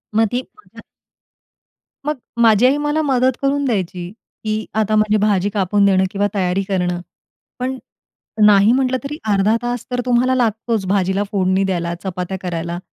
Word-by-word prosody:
मग 225 0 +4
ती 245 - 0 0.2
मग 425 - -17
अ - - -9 1.2
मग 300 0 -1 0.2
माझी 225 0 +5
आई 270 +3 +4
मला 295 +1 0
मदत 260 -3 +1
करून 280 +1 +1
द्यायची 185 -7 -2 0.4
की 215 0 -1
आता 215 0 +1
माझी 215 0 +3
भाजी 205 -2 +1
कापून 200 0 +1
देणं 190 -1 +4
किंवा 200 0 0
तयारी 190 0 0
करणं. 180 -2 -1 0.6
पण 260 +1 -2 0.7
नाही 205 +1 +6
म्हटलं 260 0 +1
तरी 290 +2 -5
अर्धा 200 +2 +3
तास 240 -1 -3
तर 250 0 0
तुम्हाला 250 +1 +2
लागतोच 225 -3 0
भाजीला 195 0 +1
फोडणी 190 -1 +1
द्यायला, 175 -3 -1
चपात्या 185 0 -4
करायला 170 -1 -4
210 Hz, 160 wpm, -19 LUFS, 190-250 Hz, 1.2 s, नाही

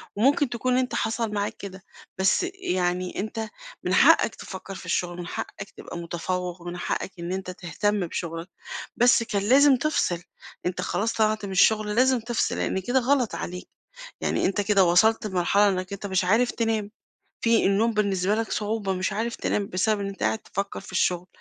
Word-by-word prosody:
وممكن 270 +4 +3
تكون 250 +1 0
أنت 255 -1 0
حصل 225 -1 -1
معاك 205 0 -2
كده، 190 -1 -9 0.3
بس 190 - +3
يعني 180 - -1
أنت 220 +2 -3 0.4
من - - 0
حقّك - - +5
تفكّر 195 +1 -8
في 185 - -9
الشُّغل 175 0 -1
من 175 -1 -6
حقّك 195 0 -6
تبقى - - -8
مُتفوِّق، 175 +1 -4
ومن 175 +1 -6
حقّك 190 - -3
إن 170 +1 -4
أنت 190 -1 -4
تهتم 205 +4 -1
بشُغلك، 165 +1 -5 0.5
بس 245 0 +5
كان 205 -3 -1
لازم 270 +6 +6
تفصِل، 240 - 0 0.4
أنت 180 0 -1
خلاص 225 +3 -1
طلعت 215 -1 +1
من 195 - -6
الشُّغل، 210 +2 +3
لازم 255 +1 +4
تفصِل 235 +1 -1
لإن - - -1
كده 245 +8 +1
غلط 255 -2 +1
عليك، 180 +1 -6 0.5
يعني - - 0
أنت 195 +2 0
كده 200 -1 +4
وصلت 215 +6 +4
لمرحلة 200 +2 +3
إنك 185 0 -2
أنت 200 0 -5
مش 190 -1 +1
عارف 225 +7 +3
تنام، 220 -3 -1 0.5
في 230 -1 +3
النوم 210 +4 +2
بالنسبة 200 -2 +1
لك 225 0 -2
صعوبة، 210 -2 -1
مش 190 +2 -1
عارف 230 +3 -2
تنام 200 -1 -1
بسبب 205 +3 +1
إن 200 - -2
أنت 195 - -8
قاعد 220 - +1
تفكّر 200 -2 -4
في 195 - -12
الشُّغل. 180 -1 +1
200 Hz, 180 wpm, -25 LUFS, 185-225 Hz, 0.5 s, لازم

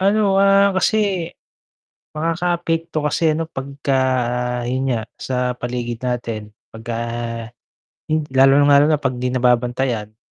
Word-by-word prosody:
Ano, 200 0 +3
ah, 195 0 +4
kasi, 205 +3 +2 1.2
makakaapekto 165 0 -1
kasi 155 +1 +1
ano 165 +1 -3
pagka 140 +1 -4 0.8
'yun 130 +1 -1
nga, 120 -4 0 0.2
sa 125 -1 -2
paligid 120 -1 -4
natin, 115 -4 -4 0.2
pagka 115 +1 -7 1.2
hin 155 -1 0
lalong-lalo 140 +2 +5
na 155 - +3
'pag 140 -3 -1
di 125 - 0
nababantayan. 125 -3 0
135 Hz, 110 wpm, -20 LUFS, 125-165 Hz, 1.2 s, lalong-lalo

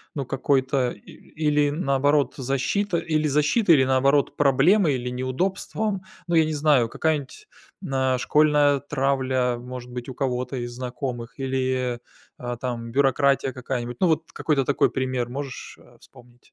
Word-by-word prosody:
ну, 140 - -3
какой-то, 130 -1 0
э, - - -15
или, 150 +4 -1
наоборот, 145 -1 +1
защита, 140 +9 -1
или 155 -2 0
защитой, 150 - +3
или, 130 - +4
наоборот, 135 +2 +2
проблемой, 145 +4 +4
или 125 0 -3
неудобством? 185 - -2 0.3
Ну, 170 - 0
я 160 -1 +5
не 155 - -2
знаю, 145 -6 +3
какая-нибудь 155 - -2 0.3
на 130 -6 0
школьная 145 +2 +3
травля, 130 -3 0
может 125 0 -8
быть, 125 +1 -6
у 125 - -7
кого-то 130 -1 -2
из 120 -1 -4
знакомых, 125 0 -5
или, 130 -2 -1 0.4
а 120 0 -4
там, 120 -2 -5
бюрократия 135 0 +2
какая-нибудь. 120 -1 -4
Ну, 185 - +3
вот 160 0 0
какой-то 145 -4 0
такой 140 - +2
пример 130 -2 -2
можешь, 135 0 -7
э, - - -20
вспомнить? 120 0 -19
135 Hz, 145 wpm, -24 LUFS, 125-150 Hz, 0.4 s, я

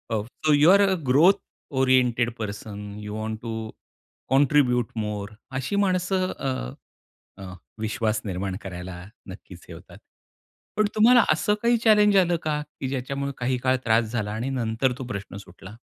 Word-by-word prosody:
Of 105 0 -3 0.2
so 155 - +5
you 145 +3 +5
are 200 +1 +6
a 190 - +2
growth 155 +10 +6 0.5
oriented 125 -2 +3
person, 105 -1 -6
you 105 0 -6
want 110 0 -4
to 110 -2 -5 0.6
contribute 130 -3 +3
मोर. 105 -2 -4 0.3
अशी 130 +9 -3
माणसं 185 -1 +1
अ, 130 - -6 0.9
विश्वास 110 0 -1
निर्माण 95 -1 -3
करायला 90 -1 -8 0.2
नक्कीच 95 -2 -11
हे - - -9
होतात. - - -14 0.8
पण 215 -1 +3
तुम्हाला 235 +3 +6
असं 210 - +1
काही 235 0 +3 0.4
आलं 175 -2 +1
का? 150 -1 -1 0.2
की 130 - -2
ज्याच्यामुळे 140 +1 -3
काही 125 +1 0
काळ 130 +1 +1
त्रास 115 0 +3
झाला 105 -3 -2
आणि 115 +5 -3
नंतर 125 0 0
तो 130 - -5
प्रश्न 100 -4 -6
सुटला? 95 +1 -12
120 Hz, 145 wpm, -24 LUFS, 105-145 Hz, 0.9 s, are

